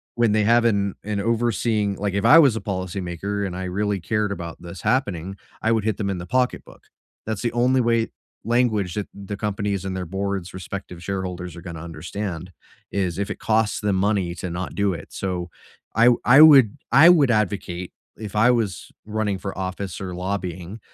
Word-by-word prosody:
when 120 -3 +2
they 110 0 +3
have 120 +2 +4
an 100 -4 +1
an 105 -2 -2
overseeing 110 -2 0
like, 100 0 -2
if 100 0 -1
I 165 - +9
was 135 -8 +5
a - - -4
policymaker 95 +1 -3
and 90 - -6
I 95 - -4
really 100 +1 -1
cared 105 +1 -1
about 85 -4 -8
this 85 +1 -9
happening, 95 -7 -1 0.2
I 115 - +1
would 110 -2 +1
hit 110 -2 +1
them 100 -2 -2
in 95 - -2
the 85 - -6
pocketbook. 125 +4 -2 0.4
That's 110 -2 -3
the 120 -1 -1
only 125 +2 +3
way 115 -1 +1 0.4
language 110 -6 +1
that 105 +1 -3
the 100 0 -7
companies 100 -2 -2
and 95 -1 -4
their 90 - -4
boards' 95 0 -3
respective 90 -1 -7
shareholders 90 -2 -4
are 85 - -9
gonna 85 -2 -8
understand, 85 +2 -6 0.4
is 95 -4 -1
if 100 +1 -2
it - - -5
costs 110 -1 +1
them 105 -2 +1
money 95 -3 +1
to 90 +1 -5
not 85 +2 -4
do 100 -2 +1
it, 80 -3 -8
so, 90 -2 -3 0.5
I 115 - +5
w 120 0 +5
I 130 +4 +7
would 135 -9 +8
I 145 +7 +8
would 150 -7 +5
advocate 95 -4 -1 0.3
if 105 -2 -8
I 115 +4 +5
was 110 -7 -1 0.2
running 105 -2 -1
for 95 0 -6
office 95 +1 -4
or 95 -2 -5
lobbying, 90 +1 -4
100 Hz, 195 wpm, -23 LUFS, 90-110 Hz, 0.5 s, I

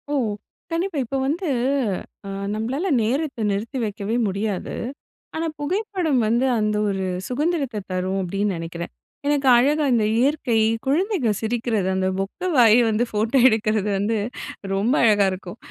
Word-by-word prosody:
ஓ! - - -2 0.6
கண்டிப்பா 335 0 -1
இப்ப 270 - -5
வந்து 335 +6 -1 0.8
அ - - -5 0.2
நம்பளால 250 - -2
நேரத்த 260 +2 -1
நிறுத்தி 220 +7 -3
வைக்கவே 205 +1 -3
முடியாது. 200 0 -3 0.6
ஆனா 325 +1 -1
புகைப்படம் 360 - 0
வந்து, 235 +4 +2
அந்த 210 0 +1
ஒரு 195 -1 -2 0.2
சுகந்திரத்த 280 -2 -1
தரும் 185 +1 -1
அப்படின்னு 195 +2 -1
நெனைக்கிறேன். 170 +1 -6 0.4
எனக்கு 290 -2 +1
அழகா 290 +5 +3
இந்த 225 -3 +3
இயற்கை, 270 -3 +1 0.3
குழந்தைங்க 325 - +1
சிரிக்கிறது 225 -3 -1
அந்த 190 0 +1
பொக்கை 200 - -3
வாய 230 -1 +7
வந்து 220 +2 +1
ஃபோட்டோ 220 +5 0
எடுக்கிறது 215 -3 +1
வந்து 210 +3 0 0.6
ரொம்ப 205 +6 +1
அழகா 210 -3 +5
இருக்கும். 185 +2 -7
225 Hz, 135 wpm, -23 LUFS, 205-285 Hz, 0.8 s, வாய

